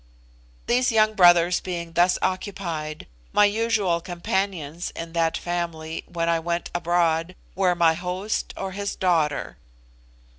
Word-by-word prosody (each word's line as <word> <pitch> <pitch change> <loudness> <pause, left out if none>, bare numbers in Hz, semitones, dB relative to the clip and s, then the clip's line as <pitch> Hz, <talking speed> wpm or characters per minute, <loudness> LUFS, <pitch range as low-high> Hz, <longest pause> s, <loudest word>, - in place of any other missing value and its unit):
These 245 +1 +2
young 215 -1 +3
brothers 175 -2 +5
being 170 -2 -5
thus 175 +2 +3
occupied, 170 -5 -3 0.3
my 210 - +6
usual 205 -5 +1
companions 175 -2 -3
in 165 0 -6
that 165 -1 +1
family, 170 -2 -4
when 170 -1 -1
I 170 0 +2
went 170 +1 -3
abroad, 170 0 +1 0.2
were 185 -2 +2
my 170 -1 +4
host 180 +5 -3
or 195 -1 -4
his 200 +1 -4
daughter. 160 -6 0
175 Hz, 125 wpm, -24 LUFS, 165-190 Hz, 0.3 s, my